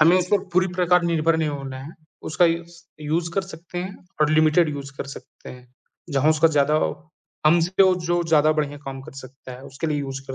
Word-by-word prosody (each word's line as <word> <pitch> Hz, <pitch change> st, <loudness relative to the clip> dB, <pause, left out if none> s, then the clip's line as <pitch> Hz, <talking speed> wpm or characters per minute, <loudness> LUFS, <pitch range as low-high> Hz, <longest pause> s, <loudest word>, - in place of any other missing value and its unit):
हमें 165 Hz, +4 st, +6 dB
इस 180 Hz, -, -1 dB
पे 205 Hz, -, +4 dB
पूरी 185 Hz, +1 st, +3 dB
प्रकार 180 Hz, 0 st, +3 dB
निर्भर 160 Hz, 0 st, +2 dB
नहीं 160 Hz, -1 st, 0 dB
होना 135 Hz, -2 st, -5 dB
है। 150 Hz, +5 st, -9 dB, 0.4 s
उसका 165 Hz, +3 st, +3 dB
यूज़ 170 Hz, 0 st, -1 dB, 0.2 s
यूज़ 165 Hz, +3 st, -1 dB
कर 195 Hz, -, +1 dB
सकते 175 Hz, -1 st, -9 dB
हैं 190 Hz, +2 st, -5 dB, 0.2 s
और 150 Hz, -, +3 dB
लिमिटेड 155 Hz, +2 st, +4 dB
यूज़ 140 Hz, -1 st, -7 dB
कर 140 Hz, -, -5 dB
सकते -, -, -13 dB
हैं। 125 Hz, 0 st, -13 dB, 0.5 s
जहाँ 145 Hz, +3 st, +4 dB
उसका 155 Hz, +1 st, +4 dB
ज़्यादा 145 Hz, +2 st, +3 dB, 0.7 s
हमसे 175 Hz, +4 st, +4 dB
वो 190 Hz, -1 st, +5 dB
जो 175 Hz, 0 st, +1 dB
ज़्यादा 155 Hz, 0 st, +5 dB
बढ़िया 145 Hz, 0 st, -4 dB
काम 135 Hz, -1 st, -6 dB
कर -, -, -12 dB
सकता 130 Hz, -1 st, -11 dB
है, 125 Hz, +1 st, -11 dB
उसके 140 Hz, +3 st, -5 dB
लिए 150 Hz, -2 st, -1 dB
यूज़ 135 Hz, -1 st, -5 dB
कर 135 Hz, -, -6 dB
155 Hz, 215 wpm, -23 LUFS, 140-175 Hz, 0.7 s, हमें